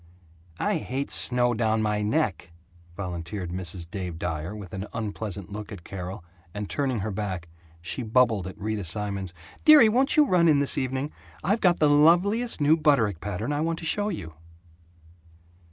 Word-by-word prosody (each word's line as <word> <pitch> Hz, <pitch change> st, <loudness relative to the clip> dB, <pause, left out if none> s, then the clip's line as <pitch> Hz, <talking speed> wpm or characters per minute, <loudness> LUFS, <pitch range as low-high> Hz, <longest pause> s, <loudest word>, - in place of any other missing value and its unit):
"I -, -, 0 dB
hate 135 Hz, +2 st, -4 dB
snow 120 Hz, -1 st, +3 dB
down 110 Hz, -1 st, +1 dB
my 105 Hz, -1 st, 0 dB
neck," 105 Hz, -, -1 dB, 0.5 s
volunteered 90 Hz, 0 st, -5 dB
Mrs. 90 Hz, -1 st, -4 dB
Dave 90 Hz, -3 st, -5 dB
Dyer, 80 Hz, +3 st, -4 dB
with 100 Hz, -5 st, -9 dB
an 95 Hz, +1 st, -5 dB
unpleasant 105 Hz, -3 st, -5 dB
look 105 Hz, 0 st, -7 dB
at 95 Hz, -5 st, -9 dB
Carol 95 Hz, +1 st, -7 dB, 0.3 s
and, 105 Hz, 0 st, -4 dB
turning 130 Hz, -4 st, -1 dB
her 110 Hz, +2 st, -3 dB
back, 95 Hz, -4 st, -4 dB, 0.4 s
she 105 Hz, -, -3 dB
bubbled 110 Hz, -4 st, +2 dB
at 95 Hz, -, -9 dB
Rita 110 Hz, 0 st, -3 dB
Simons, 100 Hz, +1 st, -2 dB, 0.3 s
"Dearie, 300 Hz, -8 st, +8 dB
won't 265 Hz, +8 st, +2 dB
you 300 Hz, -, +7 dB
run 180 Hz, -8 st, +3 dB
in 155 Hz, -3 st, +5 dB
this 140 Hz, -1 st, 0 dB
evening? 130 Hz, +2 st, -2 dB, 0.3 s
I've 205 Hz, +5 st, +1 dB
got 175 Hz, -2 st, +3 dB
the 150 Hz, -, +4 dB
loveliest 175 Hz, +11 st, +4 dB
new 150 Hz, +2 st, +5 dB
Butterick 135 Hz, -, +2 dB
pattern 105 Hz, +7 st, -3 dB
I 145 Hz, -, -1 dB
want 165 Hz, +1 st, -1 dB
to 165 Hz, -, -7 dB
show 205 Hz, +5 st, 0 dB
you." 80 Hz, -, -6 dB
110 Hz, 170 wpm, -26 LUFS, 95-150 Hz, 0.5 s, Dearie